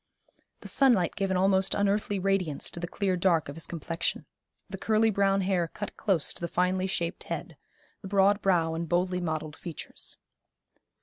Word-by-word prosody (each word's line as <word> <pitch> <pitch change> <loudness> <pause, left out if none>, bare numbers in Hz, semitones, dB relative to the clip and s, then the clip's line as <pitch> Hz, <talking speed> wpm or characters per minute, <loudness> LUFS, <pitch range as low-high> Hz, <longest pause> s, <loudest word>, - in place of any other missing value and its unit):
The - - -8
sunlight 235 -11 +4
gave 195 -1 -1
an 190 - +1
almost 190 0 +2
unearthly 205 0 +1
radiance 185 -6 -1
to - - -5
the 175 - -3
clear 190 +1 0
dark 175 -4 +2
of 140 - -7
his 165 - -4
complexion, 165 0 -3 0.4
the - - -7
curly 220 0 +3
brown 195 -1 +2
hair 185 -3 +1
cut 205 +5 -7
close 185 -8 +2
to - - -8
the 170 - -1
finely 185 +2 +1
shaped 170 -2 -2
head, - - -5 0.5
the 195 - -7
broad 200 +1 +3
brow 170 -4 +2
and 165 0 -4
boldly 180 +1 +1
modelled 155 -2 -3
features. 170 -3 -6
185 Hz, 175 wpm, -28 LUFS, 170-195 Hz, 0.5 s, sunlight